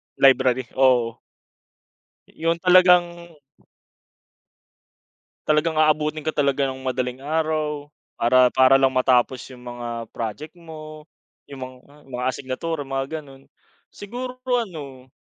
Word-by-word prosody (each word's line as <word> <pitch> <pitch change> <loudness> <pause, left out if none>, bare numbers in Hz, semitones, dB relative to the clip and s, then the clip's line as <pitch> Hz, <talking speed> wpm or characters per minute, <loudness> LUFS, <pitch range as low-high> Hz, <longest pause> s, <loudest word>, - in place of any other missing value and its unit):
Library, 130 -2 +4
oo. 125 -3 +3 1.1
Yung 165 +1 -2
talagang 175 -2 +4 2.1
Talagang 155 +1 +2
aabutin 155 0 +1
ka 155 - -1
talaga 140 -1 +1
ng 130 0 -7
madaling 130 0 -3
araw 155 -1 -1 0.3
para 125 +1 +4
para 130 +1 +5
lang 135 -1 +4
matapos 130 0 +2
yung 125 -2 -13
mga 120 -1 -7 0.2
project 115 +7 -5
mo, 155 -2 -11 0.4
yung 140 -2 -8
mga 130 0 -10 0.2
mga 125 -2 -6
asignatura 140 +4 -3
mga, 135 +3 -4
gano'n, 135 -1 -17 0.4
siguro, 250 +5 -7
ano 160 - -3
140 Hz, 105 wpm, -23 LUFS, 130-160 Hz, 2.1 s, para